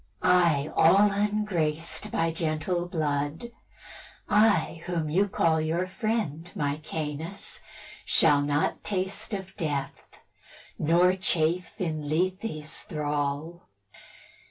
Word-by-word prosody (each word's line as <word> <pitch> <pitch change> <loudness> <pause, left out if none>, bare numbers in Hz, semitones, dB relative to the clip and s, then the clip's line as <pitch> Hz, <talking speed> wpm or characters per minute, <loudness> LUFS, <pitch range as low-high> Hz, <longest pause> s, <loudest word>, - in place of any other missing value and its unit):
I, 170 -5 +3
all 200 +5 +6
ungraced 200 -6 -1
By 165 0 0
gentle 165 +2 -1
blood, 155 +5 -2 0.8
I, 170 -7 +3
whom 165 -4 -2
you 195 +5 +3
call 160 -4 +2
Your 165 +3 0
friend, 185 -4 -2
Maecenas, 150 +3 -4 0.4
shall 145 -3 +4
not 145 +1 0
taste 200 +3 -2
Of 190 -2 -5
death, 145 -6 -2 0.9
nor 175 +4 +4
chafe 180 +1 0
in 155 -5 -3
Lethe's 175 -1 -1
thrall. 150 0 -3
165 Hz, 95 wpm, -27 LUFS, 155-190 Hz, 0.9 s, all